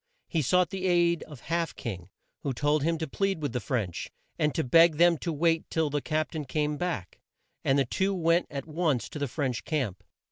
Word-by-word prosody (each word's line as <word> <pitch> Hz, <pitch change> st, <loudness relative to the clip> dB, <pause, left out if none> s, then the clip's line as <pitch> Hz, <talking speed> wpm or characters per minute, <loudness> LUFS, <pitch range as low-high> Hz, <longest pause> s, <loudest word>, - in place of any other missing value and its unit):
He 165 Hz, -, 0 dB
sought 180 Hz, +7 st, +3 dB
the 190 Hz, -1 st, -2 dB
aid 170 Hz, -1 st, +3 dB
of 145 Hz, -6 st, -11 dB
Half 165 Hz, -1 st, -1 dB
King, 95 Hz, -7 st, -6 dB, 0.3 s
who 140 Hz, -, -2 dB
told 145 Hz, +5 st, +1 dB
him 165 Hz, +3 st, +1 dB
to 160 Hz, 0 st, -3 dB
plead 195 Hz, +4 st, -1 dB
with 145 Hz, -6 st, -3 dB
the 125 Hz, -, 0 dB
French, 110 Hz, -10 st, -2 dB, 0.3 s
and 150 Hz, -, +2 dB
to 160 Hz, -, +1 dB
beg 165 Hz, +5 st, +6 dB
them 170 Hz, +1 st, +6 dB
to 170 Hz, -, -2 dB
wait 165 Hz, +1 st, +1 dB
till 160 Hz, -3 st, 0 dB
the 145 Hz, 0 st, 0 dB
Cap 155 Hz, +1 st, -1 dB
tain 155 Hz, -3 st, -4 dB
came 150 Hz, +2 st, -1 dB
back, 145 Hz, -, -4 dB, 0.4 s
and 135 Hz, -, +3 dB
the 135 Hz, -, +3 dB
two 190 Hz, +10 st, 0 dB
went 170 Hz, 0 st, +2 dB
at 140 Hz, -3 st, -5 dB
once 155 Hz, -5 st, 0 dB
to 150 Hz, -, -7 dB
the 145 Hz, -, 0 dB
French 130 Hz, -2 st, -2 dB
camp. 130 Hz, -, -2 dB
155 Hz, 215 wpm, -28 LUFS, 135-170 Hz, 0.4 s, beg